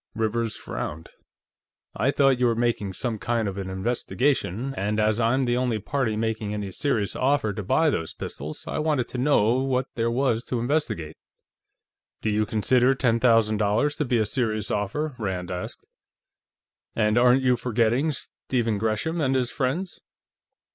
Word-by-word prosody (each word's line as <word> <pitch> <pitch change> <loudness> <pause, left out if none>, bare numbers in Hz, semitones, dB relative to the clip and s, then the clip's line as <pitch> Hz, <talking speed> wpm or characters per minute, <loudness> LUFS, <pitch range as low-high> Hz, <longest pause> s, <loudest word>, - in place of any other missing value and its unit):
Rivers 115 0 -1
frowned. 80 +2 -6 0.9
"I 115 +7 +1
thought 135 -2 +3
you 125 - +4
were 115 - +2
making 115 -4 0
some 115 +1 -3
kind 115 -1 0
of 100 0 -4
an 95 -1 -4
investigation, 120 +3 -1
and 105 0 -1
as 110 +1 +2
I'm 120 +4 +2
the 120 -1 +1
only 125 -3 0
party 115 +1 -1
making 110 -1 -2
any 100 -2 -4
serious 110 -2 -1
offer 130 -5 +1
to 105 - -4
buy 155 - +2
those 80 - -2
pistols, 75 +2 -7
I - - -2
wanted 150 -6 0
to 125 - -5
know 125 -3 +3
what 130 -1 0
there 115 0 0
was 120 -1 +1
to 125 - -2
investigate." 120 - -2 1.1
"Do 110 - +1
you 105 0 +1
consider 125 +5 +3
ten 115 -3 +2
thousand 115 -3 +4
dollars 110 +8 +1
to 150 - 0
be 120 -1 +1
a 110 - +2
serious 110 -2 -1
offer?" 130 +9 -2
Rand 95 -4 -3
asked. 90 0 -5 1.1
"And 105 -1 +2
aren't 125 +2 +5
you 125 -1 +4
forgetting 120 +5 +1
Stephen 120 -5 -2
Gresham 110 +10 -1
and 135 -2 +1
his 125 -2 0
friends?" 155 +8 -2
115 Hz, 165 wpm, -25 LUFS, 105-130 Hz, 1.1 s, aren't